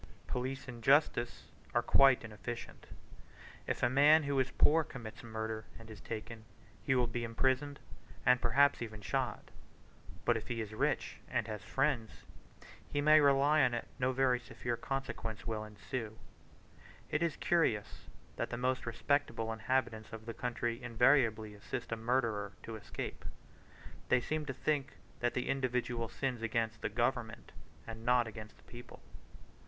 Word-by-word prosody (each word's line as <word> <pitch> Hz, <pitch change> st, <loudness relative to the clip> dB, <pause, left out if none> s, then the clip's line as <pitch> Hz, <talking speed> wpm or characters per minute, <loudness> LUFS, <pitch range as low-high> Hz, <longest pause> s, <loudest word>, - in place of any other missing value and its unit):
Police 130 Hz, +2 st, -3 dB
and 120 Hz, -2 st, -8 dB
justice 135 Hz, -3 st, +3 dB, 0.3 s
are -, -, +3 dB
quite 135 Hz, -3 st, +6 dB
inefficient. 115 Hz, +2 st, -7 dB, 0.8 s
If -, -, -2 dB
a -, -, +6 dB
man 145 Hz, +5 st, +6 dB
who 140 Hz, -1 st, 0 dB
is 130 Hz, 0 st, +2 dB
poor 160 Hz, +2 st, +4 dB
commits 120 Hz, -8 st, -9 dB
murder 110 Hz, -1 st, -4 dB
and 115 Hz, -1 st, -12 dB
is 105 Hz, -, -10 dB
taken, 115 Hz, 0 st, -6 dB, 0.4 s
he 135 Hz, -, +2 dB
will 125 Hz, -1 st, +3 dB
be 120 Hz, 0 st, -3 dB
imprisoned, 130 Hz, +4 st, 0 dB, 0.5 s
and 125 Hz, 0 st, +5 dB
perhaps 140 Hz, -1 st, +4 dB
even 110 Hz, -2 st, -6 dB
shot; 95 Hz, -1 st, -2 dB, 0.7 s
but 120 Hz, -, +4 dB
if 115 Hz, -, -4 dB
he 120 Hz, -2 st, -3 dB
is 110 Hz, -1 st, -4 dB
rich 110 Hz, -, -1 dB
and 125 Hz, -3 st, 0 dB
has 105 Hz, -1 st, -5 dB
friends, 135 Hz, -5 st, -1 dB, 0.7 s
he 145 Hz, -, 0 dB
may 155 Hz, +1 st, +7 dB
rely 140 Hz, +2 st, +5 dB
on 125 Hz, -3 st, +3 dB
it 120 Hz, -, -4 dB
no 125 Hz, 0 st, +2 dB
very 130 Hz, -1 st, +2 dB
severe 120 Hz, 0 st, -4 dB
consequence 135 Hz, -4 st, -4 dB
will 110 Hz, -1 st, -2 dB
ensue. 110 Hz, +1 st, -6 dB, 0.9 s
It 150 Hz, -, +1 dB
is 170 Hz, -3 st, +1 dB
curious 135 Hz, -12 st, 0 dB, 0.3 s
that -, -, -2 dB
the 120 Hz, -, -3 dB
most 130 Hz, 0 st, -1 dB
respectable 115 Hz, -2 st, 0 dB
inhabitants 110 Hz, -1 st, -1 dB
of 110 Hz, -1 st, -8 dB
the 115 Hz, -, -5 dB
country 120 Hz, 0 st, -2 dB
invariably 115 Hz, -3 st, +3 dB
assist 115 Hz, +4 st, -6 dB
a -, -, +1 dB
murderer 110 Hz, -4 st, 0 dB
to 115 Hz, -, -6 dB
escape: 105 Hz, -, -6 dB, 0.9 s
they 125 Hz, -, +5 dB
seem 155 Hz, +4 st, -3 dB
to 135 Hz, -, -2 dB
think 140 Hz, 0 st, -1 dB, 0.3 s
that 120 Hz, 0 st, 0 dB
the 125 Hz, -, -1 dB
individual 125 Hz, -3 st, -1 dB
sins 130 Hz, -4 st, -2 dB
against 115 Hz, 0 st, -1 dB
the -, -, -1 dB
government, 120 Hz, -2 st, -1 dB, 0.3 s
and 115 Hz, -1 st, -8 dB
not 120 Hz, 0 st, +4 dB
against 110 Hz, -1 st, -9 dB
the -, -, -22 dB
people. 120 Hz, 0 st, -12 dB
120 Hz, 155 wpm, -34 LUFS, 110-135 Hz, 0.9 s, may